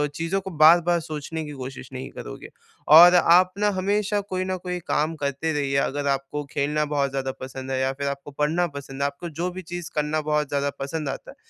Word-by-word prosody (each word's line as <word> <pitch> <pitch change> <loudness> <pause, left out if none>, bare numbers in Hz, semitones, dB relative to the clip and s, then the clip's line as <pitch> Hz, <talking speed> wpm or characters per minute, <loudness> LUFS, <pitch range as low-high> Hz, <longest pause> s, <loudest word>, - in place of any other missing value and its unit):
चीज़ों 165 +5 -1
को 190 - -7
बार-बार 170 +1 +6
सोचने 155 +1 -5
की 150 - -7
कोशिश 130 0 -8
नहीं 130 +1 -6
करोगे - - -9 0.5
और 175 +2 +9
आप 180 +1 +5
ना, 210 0 +3
हमेशा 200 +1 0 0.2
कोई 185 0 -1
न 185 0 -2
कोई 180 -1 -3
काम 155 +2 0
करते 140 +1 -2
रहिए। 140 -2 -1
अगर 140 +1 -1
आपको 140 +2 -2
खेलना 150 +2 0
बहुत 145 -2 0
ज़्यादा 135 -1 -2
पसंद 130 0 -7
है, 130 - 0
या 130 0 +1
फिर 140 +1 -4
आपको 140 +1 -5
पढ़ना 155 +5 0
पसंद 135 -1 -7
है, - - +2
आपको 140 +5 -4
जो 170 +3 -3
भी 185 +1 -7
चीज़ 175 0 -7
करना 150 +1 0
बहुत 150 -1 0
ज़्यादा 140 0 0
पसंद 140 +1 -3
आता 135 - -6
है, - - -17
150 Hz, 215 wpm, -24 LUFS, 140-175 Hz, 0.5 s, और